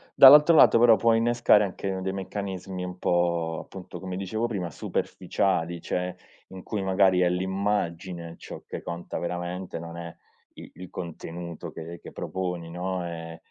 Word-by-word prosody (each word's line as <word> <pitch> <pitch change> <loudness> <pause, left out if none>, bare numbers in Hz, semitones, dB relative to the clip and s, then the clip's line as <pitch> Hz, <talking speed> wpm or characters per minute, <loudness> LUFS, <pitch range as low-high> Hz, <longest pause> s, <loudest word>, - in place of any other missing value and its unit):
dall'altro 150 +4 +9
lato 115 - +7
però 115 -1 +7
può 115 +3 +3
innescare 115 -2 +4
anche 95 0 -4
dei 95 0 -2
meccanismi 95 -1 -5
un 90 0 -7
po', 85 -3 0
appunto 95 -2 -9
come 95 -1 -5
dicevo 110 +5 -2
prima, 95 -7 -3
superficiali 85 -1 -1
cioè 90 0 -2 0.3
in 95 -1 -10
cui 105 -3 -3
magari 95 -1 +3
è 90 - +4
l'immagine 90 -2 -2
ciò - - -10
che - - -6
conta 85 +1 -5
veramente 90 +1 -4
non 85 0 -8
è 85 -1 -7 0.4
i - - -12
il 90 -1 -10
contenuto 85 0 -7
che 85 +1 -8
che - - -10
proponi, 90 -3 -4
no, 90 0 -3
ehm 80 -1 -7
90 Hz, 155 wpm, -26 LUFS, 85-95 Hz, 0.4 s, dall'altro